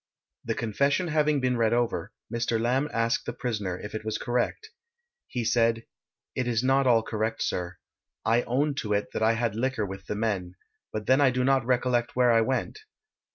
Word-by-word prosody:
The - - -2
confession 140 - 0
having 150 -1 +2
been 125 -1 +1
read 115 -1 +2
over, 120 -1 0 0.2
Mr. 115 -1 0
Lamb 130 +6 +1
asked 115 0 0
the 120 - -2
prisoner 105 -8 -3
if 105 - -8
it 110 - -4
was 110 0 -2
correct. 125 - -2 0.6
He 120 -2 -3
said: 115 0 +2 0.5
it 130 -1 -2
is 115 -1 +1
not 135 +1 +3
all 115 -2 +4
correct, 110 0 -2
sir. 90 0 -3 0.5
I 115 +2 +3
own 140 +5 0
to 105 -6 -1
it 100 0 -1
that - - -2
I 110 +1 +4
had 115 -1 -1
liquor 125 -2 0
with 95 0 -8
the - - -2
men, 100 -5 -2 0.4
but 110 -1 -4
then 130 +5 +4
I 140 - +6
do 125 0 0
not 135 -1 +3
recollect 125 -1 +1
where 125 -1 +4
I 115 -1 +5
went. 130 - -1
120 Hz, 195 wpm, -27 LUFS, 110-130 Hz, 0.6 s, I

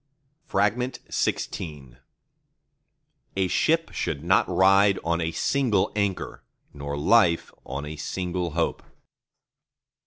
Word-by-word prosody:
XVI 95 - -2 1.4
A 95 -1 +2
ship 165 - +1
should 70 - -3
not 95 +3 +3
ride 95 +2 +5
on 85 0 0
a 80 - 0
single 120 -3 +1
anchor, 100 -3 -2 0.3
nor 70 0 -5
life 85 +2 +3 0.2
on 70 +2 -4
a 75 +1 -7
single 90 +3 -3
hope. 85 - 0
90 Hz, 95 wpm, -25 LUFS, 80-100 Hz, 1.4 s, ride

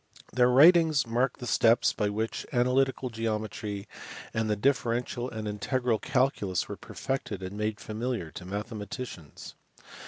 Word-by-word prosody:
Their 125 -1 +4
writings 155 +2 +6
mark 120 +2 0
the 125 - -7
steps 115 +1 +4
by 105 -1 0
which 110 +2 -2
analytical 130 0 +1
geometry 110 -2 -3 0.5
and 110 -1 0
the 105 - +2
diffe 135 +4 +3
rential 120 +1 -2
and 110 -2 -5
integral 115 +3 0
calculus 125 -9 0
were - - -5
perfected 110 -8 -4
and 95 +2 -6
made 105 0 -2
familiar 110 -6 -3
to - - -9
mathematicians. 105 - -6
115 Hz, 135 wpm, -28 LUFS, 105-130 Hz, 0.5 s, writings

